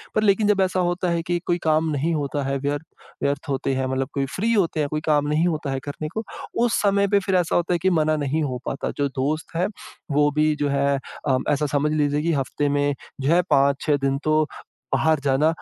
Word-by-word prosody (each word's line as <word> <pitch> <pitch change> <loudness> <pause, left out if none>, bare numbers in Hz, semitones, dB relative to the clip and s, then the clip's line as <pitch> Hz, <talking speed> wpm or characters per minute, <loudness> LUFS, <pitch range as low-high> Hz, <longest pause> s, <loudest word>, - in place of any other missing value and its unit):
पर 215 - +2
लेकिन 205 0 +3
जब 205 -2 +3
ऐसा 185 0 +1
होता 175 0 0
है 170 0 0
कि 175 +1 0
कोई 175 - +1
काम 160 0 +2
नहीं 155 +3 0
होता 145 -2 -2
है 135 +1 -1
व्यर्थ, 145 +2 -2 0.4
व्यर्थ 140 +2 -1
होते 135 0 -1
हैं 130 0 0
मतलब 130 0 -1
कोई 140 -1 0
फ्री 225 +4 0
होते 175 -7 +1
हैं, 145 -1 0
कोई 155 +1 -2
काम 150 -2 +2
नहीं 155 +3 +2
होता 155 -4 -2
है 135 - -2
करने 145 +1 -5
को 220 - -3 0.4
उस 235 - +1
समय 200 -1 +3
पे 200 0 +3
फिर 195 - +1
ऐसा 180 -3 +1
होता 175 +1 +1
है 175 - +1
कि 190 - +4
मना 155 0 +2
नहीं 155 +3 0
हो 130 -3 -2
पाता। 135 - -3
जो 145 - +1
दोस्त 155 +4 -2
हैं 175 +2 +1 0.4
वो 145 +1 +4
भी 155 0 +3
जो 145 - +1
है 140 0 +2 0.3
अ, 130 -2 +3
ऐसा 150 +1 +1
समझ 150 +1 +2
लीजिए 145 -1 +1
कि 165 +2 +1
हफ्ते 145 +1 -1
में 145 0 +1 0.3
जो 140 +5 +2
है 175 - +5
5-6 140 +2 +3
दिन 135 0 0
तो 155 0 +3 0.5
बाहर 160 -1 +2
जाना 140 +2 +3
150 Hz, 235 wpm, -23 LUFS, 140-170 Hz, 0.5 s, है